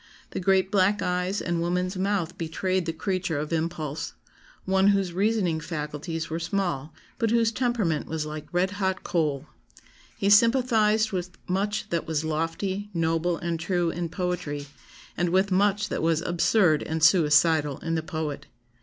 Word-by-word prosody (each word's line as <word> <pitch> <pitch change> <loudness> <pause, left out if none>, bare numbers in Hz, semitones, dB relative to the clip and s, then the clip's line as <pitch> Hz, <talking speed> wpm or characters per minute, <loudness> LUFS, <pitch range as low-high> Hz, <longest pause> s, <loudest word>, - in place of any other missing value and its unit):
The - - -3
great 190 0 +2
black 200 +1 +3
eyes 180 +2 -1
and 170 -1 -1
woman's 180 +2 -1
mouth 190 -3 -1
betrayed 180 +2 -1
the - - +1
creature 180 -1 -2
of 150 +3 -3
impulse; 160 -2 -3 0.5
one 190 +1 +3
whose 195 -3 +2
reasoning 190 -4 +1
faculties 155 +1 -4
were 165 +1 -3
small, 170 -5 -2 0.3
but 230 -3 +1
whose 230 0 +3
temperament 225 - 0
was 160 -1 -3
like 155 0 -7
red 180 +2 +1
hot 190 -2 -2
coal. 150 -5 -1 0.7
He 200 - +1
sympathised 220 -1 +4
with 180 -2 -4
much 200 +3 -1
that 170 -1 -1
was 160 -1 -1
lofty, 165 +6 -2
noble, 165 +1 +1
and 170 -1 -3
true 175 0 0
in 170 0 -3
poetry, 170 -5 -3 0.5
and 175 0 0
with 190 +3 +2
much 205 +2 +2
that - - -2
was 165 -1 +2
absurd 175 -2 +3
and 160 -1 -3
suicidal 155 -4 +4
in 165 - -3
the 160 - 0
poet. 155 -2 -4
175 Hz, 155 wpm, -26 LUFS, 160-195 Hz, 0.7 s, sympathised